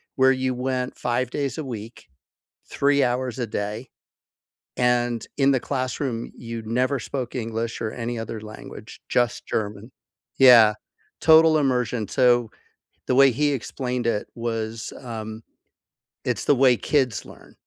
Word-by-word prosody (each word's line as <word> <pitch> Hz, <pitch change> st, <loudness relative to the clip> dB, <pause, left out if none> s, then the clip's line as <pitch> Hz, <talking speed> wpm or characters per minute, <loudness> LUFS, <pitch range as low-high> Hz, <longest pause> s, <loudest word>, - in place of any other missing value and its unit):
where 130 Hz, 0 st, +5 dB
you 130 Hz, -1 st, 0 dB
went 125 Hz, 0 st, -3 dB
5 125 Hz, +1 st, -1 dB
days 140 Hz, +2 st, -3 dB
a 155 Hz, -, -3 dB
week, 115 Hz, -5 st, -8 dB, 0.6 s
3 140 Hz, 0 st, +2 dB
hours 125 Hz, 0 st, -1 dB
a 125 Hz, -, -1 dB
day, 105 Hz, +4 st, -4 dB, 0.9 s
and 120 Hz, -2 st, +1 dB
in 135 Hz, -1 st, +4 dB
the 130 Hz, -2 st, +2 dB
classroom, 130 Hz, -2 st, -3 dB
you 115 Hz, -1 st, -6 dB
never 125 Hz, +5 st, 0 dB
spoke 125 Hz, +1 st, -5 dB
English 115 Hz, -1 st, -3 dB
or 110 Hz, -, -2 dB
any 120 Hz, 0 st, -4 dB
other 115 Hz, 0 st, -5 dB
language, 110 Hz, 0 st, -11 dB
just 120 Hz, -1 st, 0 dB
German. 105 Hz, +2 st, -3 dB, 0.5 s
Yeah. 120 Hz, -5 st, +8 dB, 0.5 s
Total 160 Hz, 0 st, +6 dB
immersion 125 Hz, -6 st, 0 dB
so, 120 Hz, -3 st, +3 dB, 0.6 s
the 125 Hz, -, +2 dB
way 135 Hz, +1 st, +7 dB
he 145 Hz, +5 st, +1 dB
explained 125 Hz, -1 st, -3 dB
it 105 Hz, -3 st, -1 dB
was, 115 Hz, -1 st, -4 dB
um, 110 Hz, -3 st, -7 dB, 0.8 s
it's -, -, -2 dB
the 145 Hz, -, +4 dB
way 130 Hz, -2 st, +4 dB
kids 130 Hz, -5 st, 0 dB
learn -, -, -15 dB
125 Hz, 140 wpm, -24 LUFS, 115-130 Hz, 0.9 s, Yeah